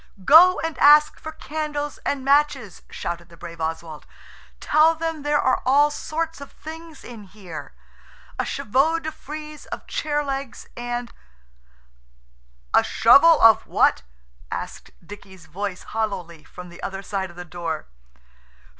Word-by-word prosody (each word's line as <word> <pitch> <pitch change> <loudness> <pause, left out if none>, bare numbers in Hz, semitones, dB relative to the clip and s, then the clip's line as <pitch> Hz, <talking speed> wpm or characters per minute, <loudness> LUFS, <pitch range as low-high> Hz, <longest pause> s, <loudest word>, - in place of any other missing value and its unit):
"Go 355 - +7
and 325 -2 -4
ask 300 +1 +6
for 315 - -7
candles 295 -2 -5
and 275 -2 -3
matches," 275 - +1
shouted 170 0 -6
the 170 - -16
brave 170 -1 -10
Oswald. 160 -1 -5 0.5
"Tell 315 +2 +3
them 325 -1 -4
there 295 0 +1
are 260 - +1
all 285 +3 +4
sorts 325 +1 -4
of 280 - -10
things 320 -1 -11
in 225 -4 -11
here–a 155 - -11
chevaux 275 +9 +1
de 315 -1 -5
frize 305 0 -10
of - - -7
chair 295 -1 -2
legs, 275 -3 -5
and–" 240 0 -5 1.6
"A - - +5
shovel 295 +8 +6
of 225 -1 +6
what?" - - +2 0.5
asked - - -6 0.2
Dicky's 190 -2 -13
voice 190 +3 -5
hollowly 185 -8 -4
from 180 0 -11
the 170 - -13
other 195 0 -5
side 195 -2 -3
of 175 - -15
the 180 0 -8
door. 170 -2 -5
260 Hz, 135 wpm, -23 LUFS, 180-300 Hz, 1.6 s, Go